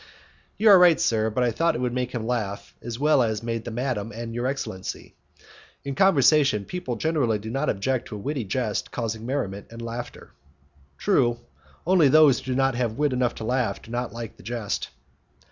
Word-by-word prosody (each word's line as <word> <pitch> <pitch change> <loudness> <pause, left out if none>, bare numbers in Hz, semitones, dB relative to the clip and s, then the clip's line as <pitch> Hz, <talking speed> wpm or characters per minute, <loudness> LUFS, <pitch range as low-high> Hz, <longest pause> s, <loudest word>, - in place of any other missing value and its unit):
"You 215 +1 +5
are 195 -3 +9
right, 175 -3 +6
sir, 110 -1 +1
but 125 +4 0
I 120 - +2
thought 165 +7 +1
it - - -3
would 125 -1 -1
make 125 0 -2
him 115 -3 -4
laugh 110 -4 -3
as 115 -1 -5
well 150 0 +3
as 110 -2 0
it - - -17
made 115 0 -3
madam 120 -2 -2
and 115 +1 -6
your 120 +2 -1
excellency. 130 -9 -5 0.7
In 140 - -3
conversation 140 - +4
people 155 - -4
generally 135 -5 +1
do 110 +2 -7
not 135 +4 -1
object 120 +5 -1
to 105 - -7
a - - -5
witty 135 +3 -3
jest 110 +1 -2
causing 115 -1 -4
merriment 105 -8 -3
and 115 - -10
laughter." 115 +1 -7 0.7
"True; 120 - +2 0.5
only 175 -4 +5
those 150 -2 +6
who 130 - -5
have - - -1 0.2
not 120 -2 -1
wit 145 -2 +1
enough 125 -1 0
to - - -7
laugh 125 +1 0
do 115 - -14
not 120 0 -2
like 115 -1 -7
the - - -15
jest." 115 0 -3
120 Hz, 195 wpm, -25 LUFS, 115-135 Hz, 0.7 s, are